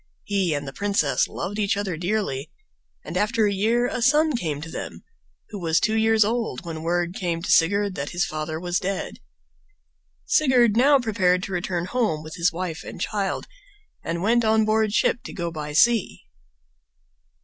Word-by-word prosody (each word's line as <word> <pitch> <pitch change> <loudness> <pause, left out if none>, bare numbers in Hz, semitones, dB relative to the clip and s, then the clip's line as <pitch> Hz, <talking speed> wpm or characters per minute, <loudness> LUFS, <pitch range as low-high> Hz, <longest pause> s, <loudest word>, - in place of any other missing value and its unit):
He 195 -6 0
and 145 -1 -4
the 135 - -6
princess 200 +2 +1
loved 205 +3 -5
each 200 0 +1
other 200 -4 -2
dearly, 175 -6 -2 0.6
and - - -7
after 215 +1 +2
a 205 - +1
year 225 +5 +1
a 245 - -2
son 300 +4 +3
came 155 -10 -2
to 165 +1 -8
them, - - -7 0.5
who 210 - -7
was 165 -2 +2
two 215 - +1
years 220 -1 +4
old 225 - -2
when 160 -2 -5
word 175 +1 -1
came 175 -5 -3
to 205 - -1
Sigurd 200 +4 +3
that 145 -3 -4
his 175 0 0
father 155 +1 -4
was 175 +1 -1
dead. 195 +1 -4 1.1
Sigurd 250 -7 +3
now 280 +4 +5
prepared 190 -7 +1
to 195 - -5
return 175 -1 -2
home 180 -8 -1
with 155 0 -9
his 170 +1 +1
wife 170 -2 -5
and - - -9
child 200 +1 -2 0.6
and 170 +1 -3
went 235 +3 +3
on 220 0 +3
board 215 0 +2
ship 235 +2 +1
to - - -7
go 170 -3 -3
by 150 -2 -6
sea. 225 +7 +2
195 Hz, 180 wpm, -24 LUFS, 170-220 Hz, 1.1 s, now